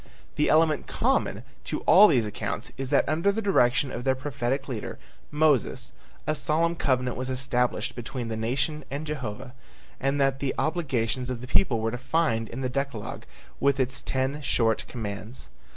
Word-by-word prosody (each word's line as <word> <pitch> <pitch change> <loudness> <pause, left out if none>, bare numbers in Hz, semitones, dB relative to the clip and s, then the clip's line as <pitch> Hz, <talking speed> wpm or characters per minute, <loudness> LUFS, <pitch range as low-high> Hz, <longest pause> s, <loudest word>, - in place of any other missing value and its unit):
The 150 - +2
element 155 -2 +3
common - - 0 0.2
to - - -3
all 210 +3 +8
these 120 - +3
accounts 105 - -4
is 135 -1 -4
that 140 - +3
under 165 +7 +2
the 210 - -2
direction 135 - +3
of 120 - -5
their 130 0 +2
prophetic 135 0 -2
leader, 120 -6 -5 0.3
Moses, 150 -4 +2 0.3
a 155 - +1
solemn 165 +3 +1
covenant 125 -5 0
was 130 +1 -3
established 125 -2 0
between 120 0 -5
the 115 - -3
nation 135 +7 -1
and 145 +3 -4
Jehovah, 130 -4 -5 0.5
and 135 +2 0
that 135 -1 +2
the 140 -1 -1
obligations 130 -7 0
of 125 -2 -3
the 125 - -7
people 130 -3 +3
were 110 0 -1
defined 125 -2 0
in 125 - -6
the 130 - 0
decalogue 135 -4 -4 0.3
with 140 0 +2
its 130 0 -1
ten 135 +3 -1
short 115 -5 +1
commands. 110 +1 -6
130 Hz, 170 wpm, -27 LUFS, 120-150 Hz, 0.5 s, all